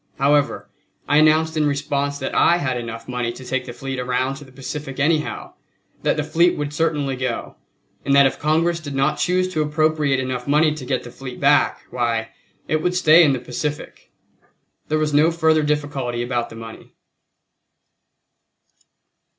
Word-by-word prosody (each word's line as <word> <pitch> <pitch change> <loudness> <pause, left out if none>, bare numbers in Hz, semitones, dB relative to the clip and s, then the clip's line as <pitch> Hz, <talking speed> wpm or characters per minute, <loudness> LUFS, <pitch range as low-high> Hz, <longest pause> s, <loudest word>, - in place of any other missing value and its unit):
However, 145 +1 +1 0.4
I 145 - +3
announced 155 +1 +4
in 155 -1 +2
response 145 0 -1
that 135 - -4
I 170 - +4
had 130 -7 -1
enough 115 -1 -6
money 125 -2 -2
to 130 - -11
take 130 0 -2
the - - -7
fleet 135 +1 -5
around 125 +1 -1
to 145 - -11
the 130 - -16
Pacific 135 +1 -7
anyhow, 155 +1 -1 0.5
that - - +1
the - - 0
fleet 170 +2 +2
would 145 0 -3
certainly 150 -4 0
go, 125 -2 -4 0.5
and 140 - +2
that 140 0 +7
if 135 - 0
Congress 165 +3 +1
did 145 -4 -7
not 135 +2 +1
choose 185 +1 +1
to 155 - 0
appropriate 150 -2 +1
enough 130 -1 -4
money 150 +2 +3
to 150 -4 -8
get 130 -1 -1
the 120 - -10
fleet 125 0 -9
back, - - +3
why, 115 -2 -1 0.4
it 155 0 0
would 180 +2 0
stay 170 -1 +6
in 145 -4 +4
the 130 - -2
Pacific. 150 +4 -5 0.8
There 155 - 0
was 155 -1 -1
no 150 +3 +5
further 160 -2 +2
difficulty 145 -5 -2
about 120 -1 -2
the - - -11
money. 115 0 -11
145 Hz, 175 wpm, -21 LUFS, 130-155 Hz, 0.8 s, that